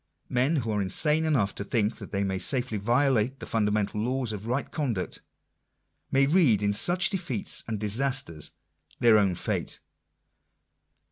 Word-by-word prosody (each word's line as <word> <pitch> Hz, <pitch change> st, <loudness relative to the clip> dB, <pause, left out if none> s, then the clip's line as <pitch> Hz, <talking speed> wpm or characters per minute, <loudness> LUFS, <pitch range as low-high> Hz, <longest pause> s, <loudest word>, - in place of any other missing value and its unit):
Men 130 Hz, +6 st, +1 dB
who 115 Hz, -7 st, -1 dB
are 105 Hz, -1 st, 0 dB
insane 150 Hz, -, +1 dB
enough 125 Hz, -11 st, +1 dB
to -, -, -5 dB
think 105 Hz, +1 st, -1 dB
that -, -, -10 dB
they 100 Hz, 0 st, -1 dB
may 95 Hz, -1 st, -2 dB
safely 120 Hz, +1 st, -1 dB
violate 125 Hz, +2 st, +1 dB
the -, -, -7 dB
fun 110 Hz, -2 st, 0 dB
damental 105 Hz, 0 st, -1 dB
laws 125 Hz, -2 st, -1 dB
of 105 Hz, +1 st, -7 dB
right 125 Hz, +4 st, -2 dB
conduct, 120 Hz, -, -3 dB, 0.9 s
may 135 Hz, +1 st, +4 dB
read 140 Hz, -, +3 dB
in 100 Hz, 0 st, +1 dB
such 175 Hz, -, +4 dB
defeats 170 Hz, -, -1 dB
and 110 Hz, -2 st, -3 dB
disasters 110 Hz, -, -1 dB, 0.5 s
their 115 Hz, -3 st, +6 dB
own 95 Hz, -3 st, +1 dB
fate. -, -, -3 dB
115 Hz, 155 wpm, -27 LUFS, 105-135 Hz, 0.9 s, their